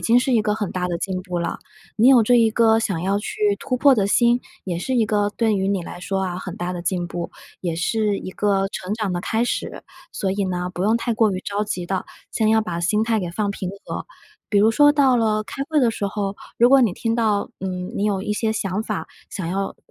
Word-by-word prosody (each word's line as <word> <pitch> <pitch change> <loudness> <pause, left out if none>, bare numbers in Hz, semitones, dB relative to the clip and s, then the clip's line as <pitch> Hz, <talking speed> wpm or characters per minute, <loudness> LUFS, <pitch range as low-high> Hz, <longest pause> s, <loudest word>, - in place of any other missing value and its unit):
经 235 +2 +4
是 260 +1 0
一 230 - +4
个 210 0 0
很 210 -2 -3
大 180 -1 -2
的 175 - -1
进 185 0 -3
步 180 -2 -3
了。 170 - -3 0.4
你 230 +4 +5
有 255 -3 +7
这 245 +3 +3
一 225 -1 +4
个 225 0 +4
想 195 -7 -1
要 195 +2 +1
去 210 - -5 0.2
突 255 - -2
破 275 +2 +6
的 200 -5 +1
心， 240 +3 +3 0.2
也 175 -3 -3
是 260 +9 -2
一 235 -3 +3
个 205 -1 +1
对 225 -2 +2
于 195 -1 0
你 195 -3 0
来 175 - -8
说 190 +1 -2
啊， 180 -1 -3
很 185 -1 -7
大 175 +1 -3
的 175 - -5
进 175 0 -1
步， 170 0 -5 0.3
也 170 -3 -2
是 210 +4 0
一 185 - -7
个 195 -1 +1
成 190 +1 -4
长 215 -4 -2
的 175 - -2
开 225 +5 0
始。 - - -3 0.3
所 190 - -2
以 200 +1 -1
呢， 180 -1 -2
不 180 - -3
用 215 +4 +3
太 235 0 -1
过 220 -1 +3
于 185 - -3
着 205 +2 -2
急 185 -4 -3
的， 190 +1 -3 0.2
先 220 -2 +1
要 220 0 +4
把 170 -4 -4
心 210 +5 +1
态 225 -1 +1
给 175 -2 -4
放 205 +3 -1
平 190 -2 -4 0.2
和。 - - -5 0.4
比 205 - +2
如 215 +2 +5
说 290 +6 +6
到 280 -3 +4
了 215 -3 +2
开 275 - -5
会 310 - +2
的 245 -5 +4
时 210 -2 -3
候， 200 0 -3 0.2
如 240 +2 +5
果 275 0 +7
你 225 -7 +3
听 230 -1 -1
到， 215 -3 +1
嗯， 185 -1 -4
你 200 - -1
有 200 -2 0
一 210 - -2
些 220 +1 0
想 205 -2 -2
法， 215 -2 -4 0.2
想 185 - -5
要 195 +2 -2
205 Hz, 270 characters per minute, -22 LUFS, 185-225 Hz, 0.4 s, 有